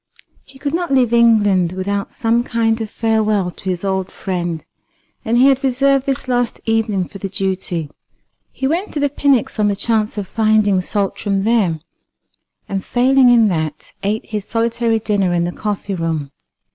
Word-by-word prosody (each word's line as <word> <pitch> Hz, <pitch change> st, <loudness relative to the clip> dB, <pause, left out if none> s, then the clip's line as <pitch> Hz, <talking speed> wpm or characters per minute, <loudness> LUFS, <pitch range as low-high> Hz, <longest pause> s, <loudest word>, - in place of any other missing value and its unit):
He 270 Hz, -, -17 dB
could 285 Hz, +2 st, -3 dB
not 345 Hz, -2 st, -1 dB
leave 250 Hz, -3 st, +3 dB
England 205 Hz, -7 st, +4 dB
without 200 Hz, +2 st, -3 dB
some 235 Hz, 0 st, +1 dB
kind 225 Hz, -2 st, 0 dB
of 220 Hz, -, -4 dB
farewell 215 Hz, -4 st, 0 dB
to -, -, -17 dB
his 180 Hz, 0 st, -2 dB
old 190 Hz, -1 st, -1 dB
friend, 175 Hz, -4 st, -4 dB, 0.6 s
and 230 Hz, +2 st, +1 dB
he 250 Hz, -, +6 dB
had 270 Hz, -1 st, +3 dB
reserved 275 Hz, +1 st, +2 dB
this 270 Hz, -1 st, -2 dB
last 245 Hz, -2 st, 0 dB
evening 220 Hz, -5 st, 0 dB
for 195 Hz, -, -11 dB
the 195 Hz, -, -4 dB
duty. 190 Hz, -4 st, -2 dB, 0.6 s
He 265 Hz, -, -4 dB
went 340 Hz, +9 st, -1 dB
to -, -, 0 dB
the 285 Hz, -1 st, +1 dB
Pnyx 275 Hz, -6 st, +1 dB
on 210 Hz, -, +3 dB
the 200 Hz, -, +1 dB
chance 215 Hz, +1 st, -1 dB
of 200 Hz, -2 st, -3 dB
finding 215 Hz, -3 st, +2 dB
Saltram 195 Hz, +1 st, -1 dB
there, 200 Hz, -8 st, +1 dB, 0.9 s
and 195 Hz, -1 st, -3 dB
failing 255 Hz, +1 st, +4 dB
in 235 Hz, -2 st, +5 dB
that, 155 Hz, -4 st, -4 dB
ate 210 Hz, +2 st, -2 dB
his 210 Hz, -2 st, -4 dB
solitary 230 Hz, 0 st, 0 dB
dinner 200 Hz, -5 st, 0 dB
in 170 Hz, -, +1 dB
the 175 Hz, -, -2 dB
coffee 205 Hz, 0 st, -4 dB
room. 165 Hz, -5 st, -3 dB
215 Hz, 170 wpm, -18 LUFS, 190-240 Hz, 0.9 s, he